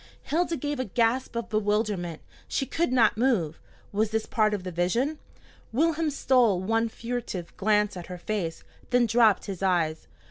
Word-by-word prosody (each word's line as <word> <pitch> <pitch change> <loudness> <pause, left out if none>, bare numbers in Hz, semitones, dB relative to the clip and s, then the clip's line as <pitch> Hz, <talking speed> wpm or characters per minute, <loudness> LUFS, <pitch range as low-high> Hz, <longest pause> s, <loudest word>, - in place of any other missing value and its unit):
Hilda 335 +1 0
gave 290 -2 -3
a 255 - -1
gasp 235 +4 0
of 235 - -3
bewilderment. 205 -5 -1 0.2
She 270 - -1
could 330 +1 -1
not 230 -4 +3
move. 195 - +1 0.3
Was 210 +1 +1
this 220 0 -1
part 215 -2 +2
of 195 - -6
the 185 - -5
vision? 230 - 0 0.5
Wilhelm 320 +5 +1
stole 250 -8 +3
one 225 +4 +1
furtive 230 -7 -5
glance 210 0 +2
at 175 -2 -7
her 180 - -6
face, 175 -3 -3 0.3
then 245 -1 +4
dropped 225 -2 +4
his 195 -3 -6
eyes. 170 -4 0
220 Hz, 165 wpm, -27 LUFS, 190-250 Hz, 0.5 s, then